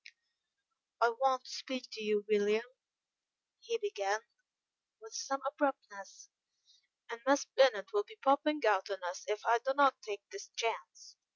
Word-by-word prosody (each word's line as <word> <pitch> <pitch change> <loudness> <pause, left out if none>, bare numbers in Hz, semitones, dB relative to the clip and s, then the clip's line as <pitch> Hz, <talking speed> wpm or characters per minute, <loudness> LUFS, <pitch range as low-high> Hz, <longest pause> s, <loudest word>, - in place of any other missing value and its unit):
"I 230 - +5
want 260 +2 +1
to - - -10
speak 255 -2 -5
to 220 - -7
you, 210 -1 +1
William," 210 +2 +2 0.9
he 465 0 -3
began, 215 - -2 0.8
with 445 0 -14
some 275 -13 -3
abruptness, 270 - -3 0.8
"and 235 0 -7
Miss 280 +1 +4
Bennet 245 -8 +3
will 415 - +3
be 445 -1 -15
popping 300 -3 +2
out 200 -2 +3
on 190 -2 -5
us 175 +1 -5
if 210 +1 -3
I 235 +1 +4
do 265 +4 -1
not 275 -2 +4
take 205 -1 -6
this 395 +1 -9
chance. 230 -1 -4
255 Hz, 150 wpm, -34 LUFS, 210-285 Hz, 0.9 s, I